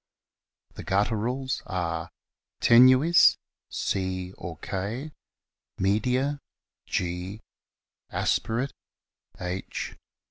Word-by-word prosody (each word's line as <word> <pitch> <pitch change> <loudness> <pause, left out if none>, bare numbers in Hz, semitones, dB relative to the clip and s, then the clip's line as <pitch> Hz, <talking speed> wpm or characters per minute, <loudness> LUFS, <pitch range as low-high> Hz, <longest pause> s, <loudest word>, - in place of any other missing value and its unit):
The - - -8
gutturals 115 +6 0
are: 85 -4 -2 0.5
Tenuis, 130 +8 +7 0.3
C 95 -1 -2
or 85 -3 -7
K; 105 - -4 0.7
Media, 125 +9 +1 0.5
G; 90 +3 -2 0.7
Aspirate, 125 +5 0 0.7
H. 90 +1 -4
105 Hz, 65 wpm, -27 LUFS, 95-130 Hz, 0.7 s, Tenuis